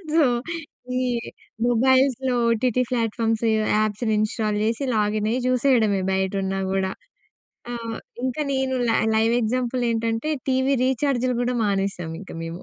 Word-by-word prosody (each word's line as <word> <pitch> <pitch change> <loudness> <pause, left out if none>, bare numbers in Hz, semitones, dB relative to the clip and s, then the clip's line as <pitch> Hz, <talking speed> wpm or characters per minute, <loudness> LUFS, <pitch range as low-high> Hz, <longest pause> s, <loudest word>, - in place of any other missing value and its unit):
So, 325 - +6 0.7
ఈ - - +1 0.7
మొబైల్స్‌లో 260 +1 +3
OTT 245 +2 +1
platforms 225 -1 0 0.4
apps 215 +2 -2
install 215 0 0
చేసి 230 +5 0
login 210 0 +1
అయ్యి 245 - 0
చూసేయడమే, 245 -5 +3
బయట 190 0 0
ఉన్నా 190 0 -2
గూడా. 190 0 0 0.8
ఆ! - - -3 0.5
ఇంకా 260 +4 -1
నేను 265 -1 0
లై 225 - +3 0.2
లైవ్ 225 +1 +3
ఎగ్జాంపుల్ 250 +2 -1
ఏంటంటే 230 +4 -1 0.2
టీవీ 260 +1 +2
రీచార్జ్‌లు 255 -1 +1
కూడా 250 +1 0
మానేసాం 195 -4 -1
ఇంక 200 - -10
మేము. 165 +2 -6
230 Hz, 130 wpm, -23 LUFS, 210-255 Hz, 0.8 s, So